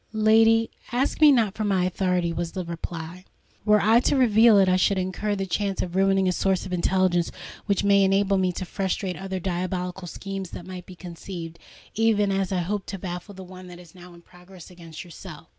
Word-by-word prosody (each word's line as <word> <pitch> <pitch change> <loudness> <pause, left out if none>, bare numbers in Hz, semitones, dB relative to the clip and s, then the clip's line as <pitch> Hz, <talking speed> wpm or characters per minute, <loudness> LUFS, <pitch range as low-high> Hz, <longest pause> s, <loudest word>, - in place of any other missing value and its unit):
"Lady, 225 +1 +4 0.2
ask 260 +5 -1
me 300 -1 +8
not 225 -7 +2
for 215 - -4
my 195 -3 +1
authority," 180 -2 0
was 170 +1 -4
the 185 -2 -4
reply. 170 +1 -7 0.4
"Were 210 -1 +5
I 220 +3 +4
to 255 - +1
reveal 230 -4 +5
it, 195 -1 +5
I 185 - +3
should 190 +2 +2
incur 185 +3 -2
the 195 -1 -3
chance 195 +1 -2
of 180 0 -6
ruining 195 0 +2
a - - +2
source 190 +1 0
of 185 - -6
intelligence 180 -1 +1 0.4
which 200 -1 +1
may 200 -1 +4
enable 195 0 +2
me 185 -1 +1
to 185 - -5
frustrate 190 0 -3
other 190 -1 -5
diabolical 180 0 -3
schemes 195 +1 -6
that 175 - -9
might 180 -1 -9
be 185 - -11
conceived, 170 -1 -8 0.3
even 210 -2 +2
as 195 -1 -1
I 185 -2 0
hope 195 +3 -3
to 195 - -5
baffle 180 +2 -7
the 190 - -9
one 185 0 -12
that 175 -1 -11
is 175 -2 -16
now 180 -1 -14
in 170 - -17
progress 180 0 -15
against 165 -3 -10
yourself. 170 -3 -12
190 Hz, 210 wpm, -24 LUFS, 180-200 Hz, 0.4 s, me